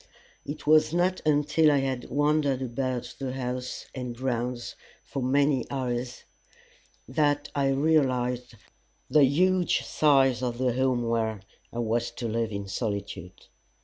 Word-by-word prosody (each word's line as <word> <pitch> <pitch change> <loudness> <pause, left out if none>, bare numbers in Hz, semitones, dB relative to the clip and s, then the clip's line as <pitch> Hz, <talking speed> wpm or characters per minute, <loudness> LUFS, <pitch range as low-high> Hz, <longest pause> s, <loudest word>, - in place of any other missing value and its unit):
It 145 +1 -6
was 155 +2 +4
not 180 +1 +1
until 150 +1 +3
I 145 - +3
had 130 -2 -3
wandered 145 -2 +1
about 125 -1 -3
the 130 -2 -3
house 125 -1 -4
and 125 -2 -5
grounds 125 -1 -2 0.3
for 135 - -5
many 135 0 +2
hours 125 -2 -3 0.8
that 145 +2 +1
I 140 -1 +1
realized 130 -5 +1 0.6
the 150 -1 +6
huge 180 +5 +2
size 135 -5 +3
of 120 -2 -2
the 125 -1 +1
home 125 -2 +1
where, 110 -3 -1 0.3
I - - -8
was 120 0 0
to 120 - -3
live 115 0 -1
in 100 -1 -5
solitude. 100 -3 -5
130 Hz, 135 wpm, -27 LUFS, 120-145 Hz, 0.8 s, the